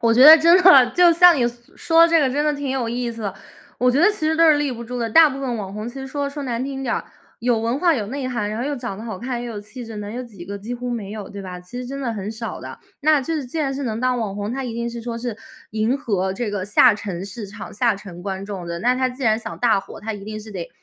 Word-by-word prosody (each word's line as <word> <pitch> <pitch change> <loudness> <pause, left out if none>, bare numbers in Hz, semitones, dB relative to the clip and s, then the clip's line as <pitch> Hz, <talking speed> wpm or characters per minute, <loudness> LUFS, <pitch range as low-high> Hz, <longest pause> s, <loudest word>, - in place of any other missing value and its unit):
我 230 -1 +3
觉 250 - +6
得 315 +1 +12
真 335 +3 +6
的， 275 -9 +8
就 350 -1 +7
像 350 -1 +7
你 245 - +2
所 240 0 -9
说 330 0 +5
这 330 -1 +4
个 270 -3 +2
真 290 +3 0
的 300 -1 +1
挺 285 -1 -4
有 260 -3 -1
意 240 +1 -2
思 230 -1 -8
的。 200 -2 -3 0.4
我 250 - +3
觉 265 +4 +2
得 355 - +6
其 370 -7 -3
实 320 - +1
都 330 -1 +6
是 300 - +6
立 290 -2 -1
不 235 -1 -7
住 245 +1 -5
的， 230 - -1
大 320 +6 +7
部 275 -1 -6
分 250 -4 -2
网 195 -3 -6
红 210 +2 -5
其 240 - -10
实 270 -1 -6
说 285 +1 -3
说 285 0 -6
难 245 -2 -2
听 270 0 -5
点 245 -3 -1
儿， - - -3 0.4
有 240 -1 +1
文 230 +4 -1
化 340 0 +3
有 215 -7 -2
内 270 +2 -4
涵， 215 -5 -2
然 215 +2 -4
后 - - -2
又 290 - -1
长 235 -6 -6
得 225 - -8
好 220 -4 -5
看， 245 0 -4
又 240 - -5
有 210 - -6
气 240 +4 -10
质 225 - -9
的， 210 - -6
能 205 +1 -6
有 245 - -4
几 200 -7 -11
个， 200 +2 -6
几 225 +5 -6
乎 245 0 -5
没 215 -4 -4
有， 210 -2 -7
对 200 - -8
吧？ 180 -2 -7
其 180 +8 -9
实 250 - -5
真 275 +2 -6
的 240 -4 -2
很 200 -2 -5
少 225 +1 -6
的， - - -8 0.2
那 305 0 +4
就 270 +5 -4
是 295 -5 -3
既 250 - -8
然 280 -3 0
是 275 +1 -4
能 225 -2 -3
当 255 -1 +1
网 210 -4 -3
红， 205 +2 -4
他 270 +1 -3
一 235 -2 -5
定 235 0 -3
是 235 0 -7
说 230 0 -5
是 235 -2 -4 0.3
迎 220 +4 0
合 195 -8 -1
这 215 +2 -3
个 200 -2 -3
下 215 +4 +5
沉 195 -3 -5
市 205 +2 -7
场， 200 +2 -9
下 235 +1 +2
沉 190 -3 -10
观 190 0 -4
众 195 -4 -6
的， 170 0 -5
那 250 +3 +2
他 260 0 +1
既 255 +2 -9
然 220 -3 +3
想 225 - -7
大 230 -4 +3
火， - - -9
他 220 +1 -4
一 200 -1 -8
定 215 0 -6
是 215 +1 -11
得 180 -4 -6
240 Hz, 345 characters per minute, -21 LUFS, 210-270 Hz, 0.4 s, 得